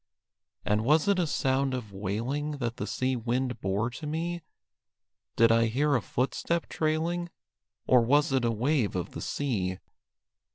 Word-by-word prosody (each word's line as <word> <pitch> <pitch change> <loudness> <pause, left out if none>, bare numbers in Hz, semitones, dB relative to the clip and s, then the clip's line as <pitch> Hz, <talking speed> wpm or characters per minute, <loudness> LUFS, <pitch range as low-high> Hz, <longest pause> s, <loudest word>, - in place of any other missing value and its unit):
And 105 +1 +1
was 150 - +3
it 200 -2 +3
a 175 - +1
sound 135 -1 +1
of 110 -5 -6
wailing 115 +10 -2
That 120 -4 -3
the - - -3
sea 130 0 0
wind 125 +2 -2
bore 100 +5 0
to 150 +5 -7
me? 170 +3 -2 0.9
Did 115 0 +5
I 115 0 +4
hear 145 +6 +1
a 125 - +2
footstep 150 +9 -1
trailing? 165 +3 -1 0.6
Or 125 -1 +5
was 145 +5 +3
it 135 -2 +2
a 120 - +2
wave 120 -1 0
of 90 - -3
the - - -7
sea? 100 -10 -2
130 Hz, 160 wpm, -28 LUFS, 115-150 Hz, 0.9 s, Did